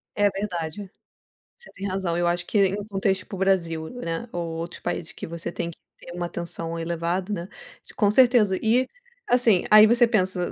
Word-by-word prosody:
É 205 0 +4
verdade, 190 -1 -5 0.7
você 475 - -13
tem 200 +1 -5
razão. 185 -3 -2
Eu 175 0 +1
acho 175 0 -1
que 205 - 0
em 200 +2 -2
contexto 195 -2 -1
para 195 - -8
o - - -8
Brasil, 170 -5 0
né, 235 -3 -5
ou 175 -1 -3
outros 170 +1 -6
países 165 - -3
que - - -8
você 170 +1 -5
tem 170 0 -4
que - - -17 0.2
ter 175 - -12
uma 175 0 -3
atenção 170 -1 -5
elevada, 170 +3 -2
né, 180 0 -5 0.5
com 205 -2 +3
certeza. 235 -5 +4
E 245 +4 +2 0.4
assim, 240 - +4
aí 215 0 +9
você 235 +1 +4
pensa: 185 -5 0
190 Hz, 190 wpm, -24 LUFS, 170-210 Hz, 0.7 s, aí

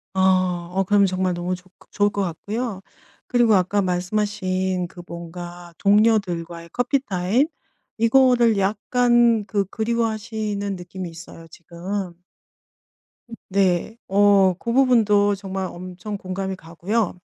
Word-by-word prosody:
아 185 -2 +2
어 190 +1 +1
그러면 200 +1 +4
정말 185 0 0
너무 175 +1 -2
좋 180 0 -17 0.2
좋을 205 0 +2
것 200 - -2
같고요. 200 +4 -4 0.5
그리고 240 -3 +4
아까 190 +2 +2
말씀하신 185 -1 -1
그 175 0 -12
뭔가 175 +1 -9
동료들과의 185 -6 +1
커피 245 +3 +1
타임 195 +9 +1 0.5
이거를 235 -1 +4
약간 235 +3 +2
그 200 0 0
그리워하시는 220 -2 -2
느낌이 180 0 -7
있어요 165 0 -12
지금. 175 +3 -6 1.2
음 230 - -8
네. 190 +2 +1
어 195 -1 +4
그 235 - -3
부분도 215 -6 +4
정말 190 -1 -4
엄청 185 +4 -7
공감이 190 0 -4
가고요. 185 +5 -2
195 Hz, 255 characters per minute, -22 LUFS, 180-215 Hz, 1.2 s, 그러면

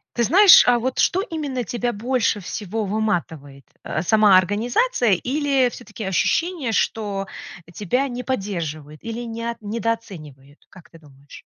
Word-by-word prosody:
Ты 235 - +1
знаешь, 380 - +8
а 245 -1 +4
вот 255 +2 -3
что 375 - +2
именно 295 - -4
тебя 240 +3 -3
больше 235 0 0
всего 210 +3 -5
выматывает? 170 -10 -3 0.2
Э, 155 - -3
сама 205 +1 +5
организация 235 - +1
или 270 - +1
всё-таки 215 -1 -10
ощущение, 270 - 0
что, 205 -3 -1 0.4
э, - - -15
тебя 210 +10 -1
не 250 -1 -6
поддерживают 165 - -5
или 230 +1 -5
не 230 -1 -6
от 235 0 -5
недооценивают? 190 - -6
Как 185 -4 -17
ты 165 - -16
думаешь? 140 -2 -16
220 Hz, 145 wpm, -21 LUFS, 180-245 Hz, 0.4 s, знаешь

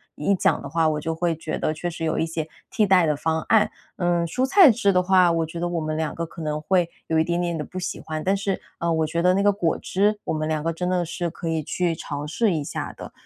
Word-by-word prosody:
一 175 +7 +1
讲 - - +1
的 140 - -7
话， 165 +2 +2
我 155 -1 -1
就 160 +1 -2
会 170 0 0
觉 160 0 -4
得 155 - -1
确 170 +3 -4
实 165 -1 -6
有 160 - 0
一 - - +1
些 160 -1 -4 0.2
替 215 - +2
代 185 -3 +5
的 150 - +2
方 160 +2 -1
案。 220 -2 +4 0.3
嗯， 175 -2 +1
蔬 250 +10 0
菜 345 +4 +7
汁 220 -3 +2
的 180 - +4
话， 180 -1 +4
我 165 -1 +1
觉 165 +2 -7
得 175 - -1
我 175 -1 -1
们 155 0 -2
两 160 -1 -2
个 170 - -3
可 165 +1 -10
能 150 -1 -2
会 175 +1 +2 0.2
有 160 - +1
一 - - +4
点 170 +1 -1
点 170 -1 -1
地 150 - -3
不 185 - -10
喜 180 - -4
欢， 155 -1 -5
但 190 +1 +2
是， 195 -1 -2 0.2
呃， 170 0 0
我 160 -1 +1
觉 170 +2 -1
得 180 +1 +4
那 195 - +2
个 205 - +5
果 175 -5 0
汁 205 +2 0
我 - - -1
们 155 0 -2
两 155 -1 -1
个 165 - 0
真 180 +2 -3
的 180 -1 +1
是 170 +1 -3
可 165 - -7
以 160 -1 0
去 175 +3 -1
尝 145 -2 -5
试 200 +7 +1
一 155 -3 -1
下 - - -5
的。 - - -9
170 Hz, 310 characters per minute, -24 LUFS, 160-185 Hz, 0.3 s, 菜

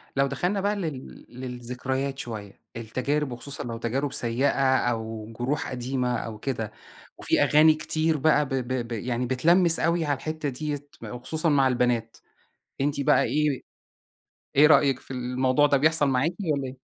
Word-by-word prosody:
لو 140 0 +3
دخلنا 180 +9 -1
بقى 205 +2 +1
لل 155 -9 -6
للذكريات 130 +2 -4
شوية، 105 -4 -7
التجارب 130 +5 -2
وخصوصًا 135 +4 -6
لو 115 -1 -5
تجارب 130 +4 -2
سيئة، 120 +4 +1 0.3
أو 110 -2 -3
جروح 135 +4 -1
قديمة 125 0 -1
أو 110 -2 -6
كده، 115 -3 -3 0.5
وفي - - +2
أغاني 155 +1 +6
كتير 155 +1 0
بقى 150 0 +3
ب - - -10
ب 130 -2 -2
ب - - -15
يعني 120 +2 -2
بتلمّس 165 +7 +3
أوي 170 -1 +1
على 145 -2 0
الحتّة 155 -1 -3
ديَّة 145 +2 -3 0.2
وخصوصًا 155 +7 0
مع 135 -2 +4
البنات، 120 -2 0 0.6
أنتِ 145 0 0
بقى 140 - +4
إيه، 150 -2 0 1.0
إيه 150 +2 +7
رأيِِك 140 -3 +4
في - - -13
الموضوع 130 +3 +1
ده، 140 - +3
بيحصل 155 0 +3
معاكِ 135 +6 +1 0.2
والَّا 140 -2 -1
إيه؟ 130 +1 -9
135 Hz, 155 wpm, -26 LUFS, 125-150 Hz, 1.0 s, إيه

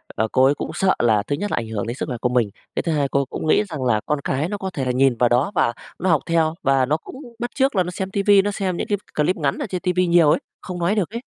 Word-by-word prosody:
ờ, 110 - 0
cô 130 0 +4
ấy 140 - +4
cũng - - -5
sợ 190 -1 +2
là 110 -4 +3
thứ 145 - 0
nhất 205 +7 -4
ảnh 115 - -2
hưởng 110 0 -3
đến 120 - -3
sức - - -4
là 125 - -3
của 125 - +1
mình, 120 -4 +1 0.3
cái - - -1
thứ 165 - -1
2 145 -3 +1
cô 140 0 +1
cũng 155 - -5
nghĩ 210 - +4
rằng 150 -5 -4
là 115 -4 +2
con 150 -1 -1
cái 145 +7 -1
nó 205 - -3
có 190 -1 -4
thể 130 -3 -1
nhìn 130 -1 +3
vào 120 +1 +3
đó 125 +9 +2
và 120 - +2 0.3
nó 185 - 0
học 160 -4 +3
theo, 165 -1 +1
và 135 -1 +3
nó 150 +4 +1
cũng - - -12 0.2
bắt 240 0 -3
chước 270 -3 +1
là 185 - +3
nó 180 - -5
xem 190 +1 -4
tivi, 200 0 +4
nó 205 +1 -1
xem 190 -3 -2
những - - -3 0.3
clip 155 +5 +2
ngắn 145 -4 -1
ở - - -3
trên 180 -2 -3
tivi 180 0 +1
nhiều 170 -3 +5
ấy, - - +3 0.2
không 180 -1 -6
nói 175 +5 +1
được 200 -4 0
ấy. 235 +2 -5
155 Hz, 305 wpm, -21 LUFS, 130-185 Hz, 0.3 s, nhiều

